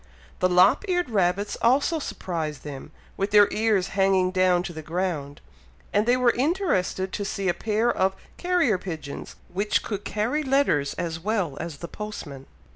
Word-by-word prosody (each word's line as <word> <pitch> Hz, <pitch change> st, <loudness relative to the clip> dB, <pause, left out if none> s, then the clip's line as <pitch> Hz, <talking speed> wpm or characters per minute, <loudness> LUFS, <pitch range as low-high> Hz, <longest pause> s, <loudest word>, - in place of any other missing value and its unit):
The 185 Hz, -, +3 dB
lop 180 Hz, -, +5 dB
eared 355 Hz, -7 st, 0 dB
rabbits 195 Hz, 0 st, +1 dB
also 280 Hz, +7 st, +3 dB
surprised 160 Hz, -, -4 dB
them, 145 Hz, -1 st, -8 dB, 0.3 s
with 195 Hz, +1 st, -1 dB
their 205 Hz, 0 st, +7 dB
ears 210 Hz, -4 st, +1 dB
hanging 190 Hz, -2 st, +2 dB
down 185 Hz, -1 st, +3 dB
to 175 Hz, -, -6 dB
the 160 Hz, -, -7 dB
ground, 155 Hz, -4 st, -3 dB, 0.5 s
and 205 Hz, +2 st, +2 dB
they 245 Hz, +1 st, +4 dB
were 250 Hz, -1 st, +4 dB
interested 250 Hz, -, 0 dB
to 205 Hz, -, -2 dB
see 195 Hz, -1 st, -3 dB
a 175 Hz, -, +3 dB
pair 220 Hz, +4 st, 0 dB
of 190 Hz, 0 st, +1 dB, 0.2 s
carrier 350 Hz, -, +2 dB
pigeons 160 Hz, -6 st, -7 dB, 0.2 s
which 205 Hz, +3 st, +1 dB
could 205 Hz, -2 st, -4 dB
carry 230 Hz, +9 st, -1 dB
letters 270 Hz, -, +1 dB
as 165 Hz, -2 st, -3 dB
well 190 Hz, -6 st, -1 dB
as 165 Hz, -3 st, -5 dB
the 170 Hz, -, -7 dB
postman. 155 Hz, -10 st, -8 dB
195 Hz, 165 wpm, -25 LUFS, 175-225 Hz, 0.5 s, their